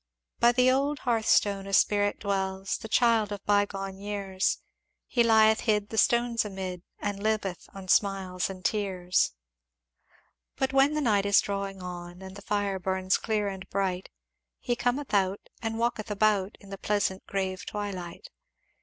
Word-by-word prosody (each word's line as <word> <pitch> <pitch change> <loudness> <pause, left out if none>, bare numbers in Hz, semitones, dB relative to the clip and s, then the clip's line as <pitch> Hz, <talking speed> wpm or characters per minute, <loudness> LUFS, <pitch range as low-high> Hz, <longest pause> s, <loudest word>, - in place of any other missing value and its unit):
"By 235 - +6
the 250 +1 +4
old 280 +3 +1
hearthstone 215 -4 +2
a 195 - -6
Spirit 205 +1 +3
dwells, 195 -1 -2
The - - -7
child 225 -3 +3
of 205 -1 -6
bygone 195 -2 0
years, 200 -2 -1 0.5
He 240 - +1
lieth 220 -1 +5
hid 210 -2 0
the 220 - -5
stones 235 -1 +3
amid, 190 -3 -5 0.2
And 205 -1 -4
liveth 210 -4 -2
on 195 -1 -9
smiles 190 -2 +1
and 185 -1 -9
tears. 190 - +1 1.2
"But 265 0 -1
when 275 +2 +4
the 305 - 0
night 205 -6 +2
is 200 - +6
drawing 195 -1 -3
on, 175 0 -8
And 190 0 -9
the 200 - -10
fire 200 -2 -1
burns 190 0 0
clear 215 -2 -1
and 190 -1 -6
bright, 190 -2 -2 0.5
He 240 - -2
Cometh 245 +3 -1
out 195 0 0
and 225 -1 -2
walketh 230 -2 -1
about, 205 -1 +1
In 200 -1 -15
the 195 - -7
pleasant 205 -2 0
grave 190 -2 -2
twilight. 190 -5 -6
200 Hz, 155 wpm, -28 LUFS, 190-220 Hz, 1.2 s, By